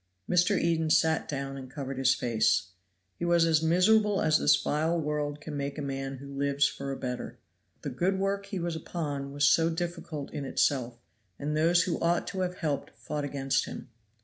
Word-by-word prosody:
Mr. 180 Hz, +3 st, +3 dB
Eden 165 Hz, -1 st, +1 dB
sat 160 Hz, 0 st, +2 dB
down 135 Hz, -1 st, -3 dB
and 130 Hz, -1 st, -8 dB
covered 135 Hz, -1 st, -5 dB
his 130 Hz, -1 st, +4 dB
face. 110 Hz, -5 st, +1 dB, 0.5 s
He -, -, -4 dB
was 170 Hz, -1 st, +4 dB
as 160 Hz, -2 st, +3 dB
miserable 195 Hz, +5 st, +4 dB
as 155 Hz, 0 st, +3 dB
this -, -, +5 dB
vile 160 Hz, +3 st, 0 dB
world 150 Hz, -1 st, -2 dB
can 150 Hz, 0 st, -7 dB
make 140 Hz, +1 st, -3 dB
a -, -, -3 dB
man 135 Hz, -1 st, -4 dB
who 140 Hz, +1 st, -10 dB
lives 140 Hz, 0 st, +2 dB
for 140 Hz, 0 st, -5 dB
a 135 Hz, -, -4 dB
better. 125 Hz, -1 st, -5 dB, 0.5 s
The 140 Hz, -, -3 dB
good 180 Hz, +9 st, 0 dB
work 200 Hz, +1 st, -1 dB
he 200 Hz, -, -4 dB
was 170 Hz, -1 st, -2 dB
upon 145 Hz, -4 st, -4 dB
was 145 Hz, 0 st, +1 dB
so 165 Hz, +3 st, +4 dB
difficult 170 Hz, -3 st, -4 dB
in 145 Hz, -, -4 dB
itself, 125 Hz, -3 st, 0 dB, 0.4 s
and 150 Hz, +1 st, -2 dB
those 170 Hz, +3 st, +4 dB
who 175 Hz, -, -2 dB
ought 170 Hz, +1 st, +2 dB
to 190 Hz, -, -5 dB
have 180 Hz, -1 st, -1 dB
helped 145 Hz, -4 st, -3 dB
fought 150 Hz, 0 st, -4 dB
against 135 Hz, -1 st, 0 dB
him. -, -, -8 dB
150 Hz, 195 wpm, -29 LUFS, 140-170 Hz, 0.5 s, this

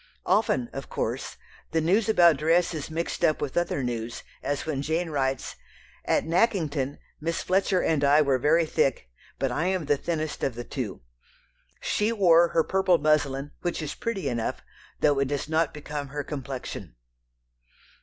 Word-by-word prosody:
Often, 130 Hz, -, +2 dB
of -, -, -6 dB
course, -, -, -3 dB, 0.3 s
the 165 Hz, -, +1 dB
news 195 Hz, +7 st, +2 dB
about 170 Hz, -7 st, +6 dB
dress 165 Hz, +4 st, +2 dB
is 155 Hz, -2 st, -5 dB
mixed 165 Hz, +2 st, -3 dB
up 155 Hz, -3 st, +3 dB
with 140 Hz, -3 st, -4 dB
other 175 Hz, -5 st, 0 dB
news, 115 Hz, -1 st, -4 dB, 0.2 s
as 145 Hz, -1 st, -2 dB
when 150 Hz, -4 st, -2 dB
Jane 160 Hz, +3 st, -1 dB
writes: 135 Hz, -2 st, -1 dB, 0.5 s
"At -, -, +2 dB
Nackington... 160 Hz, -, +1 dB, 0.2 s
Miss 165 Hz, +2 st, -2 dB
Fletcher 190 Hz, 0 st, +2 dB
and 155 Hz, -3 st, +1 dB
I 145 Hz, +2 st, +6 dB
were 135 Hz, -2 st, +2 dB
very 160 Hz, +5 st, +3 dB
thick, 135 Hz, -, 0 dB, 0.3 s
but 135 Hz, -, -1 dB
I 155 Hz, +8 st, 0 dB
am 185 Hz, -4 st, 0 dB
the 145 Hz, 0 st, +2 dB
thinnest 155 Hz, 0 st, -3 dB
of 135 Hz, -, 0 dB
the 120 Hz, -, -5 dB
two. 120 Hz, -6 st, -5 dB, 0.8 s
She 210 Hz, +2 st, +1 dB
wore 175 Hz, -6 st, +5 dB
her 165 Hz, -1 st, +2 dB
purple 190 Hz, -1 st, +3 dB
muslin, 145 Hz, -2 st, +1 dB
which 175 Hz, -1 st, -2 dB
is 155 Hz, -3 st, -4 dB
pretty 230 Hz, -, -3 dB
enough, 120 Hz, -3 st, -2 dB, 0.4 s
though 145 Hz, -2 st, +3 dB
it 140 Hz, -, +1 dB
does 145 Hz, +1 st, -2 dB
not 160 Hz, 0 st, +1 dB
become 150 Hz, -1 st, -5 dB
her 145 Hz, +1 st, -4 dB
complexion...." 135 Hz, -, -6 dB
155 Hz, 165 wpm, -26 LUFS, 140-170 Hz, 0.8 s, about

